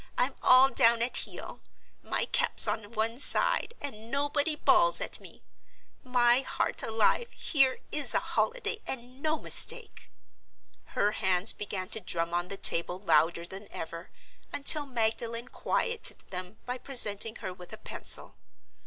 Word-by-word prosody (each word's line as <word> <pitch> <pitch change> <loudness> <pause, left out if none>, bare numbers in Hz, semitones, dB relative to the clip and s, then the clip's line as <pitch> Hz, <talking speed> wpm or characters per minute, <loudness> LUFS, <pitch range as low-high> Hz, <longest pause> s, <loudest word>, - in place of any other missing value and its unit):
I'm 260 +2 +1
all 255 +1 +6
down 230 -2 +3
at 245 - -2
heel; - - -1 0.4
my - - -1
cap's - - +4
on 220 0 -4
one 225 +2 -2
side; 470 +9 +3
and 225 -5 -8
nobody 290 +3 -1
bawls - - +3
at - - -3
me. - - -14 0.6
My 245 -1 +3
heart 270 - -2
alive, 225 - 0
here 270 -3 +3
is 295 -1 +1
a - - +3
holiday 480 -2 -2
and 255 +1 -6
no 310 +1 -1
mistake!" - - -2 0.9
Her 205 - +2
hands 190 -1 +1
began 195 -3 -5
to 220 - -2
drum 170 -3 -4
on 175 +1 -2
the 195 - -6
table 170 0 +2
louder 170 -2 +1
than 190 +3 -10
ever, 165 +1 -8 0.4
until 290 +1 +4
Magdalen 230 0 -3
quieted 470 0 -1
them 185 +2 -6
by 250 +1 -5
presenting 225 -4 +2
her 190 -4 -7
with 180 -1 -14
a - - -9
pencil. - - -3
230 Hz, 145 wpm, -28 LUFS, 190-270 Hz, 0.9 s, all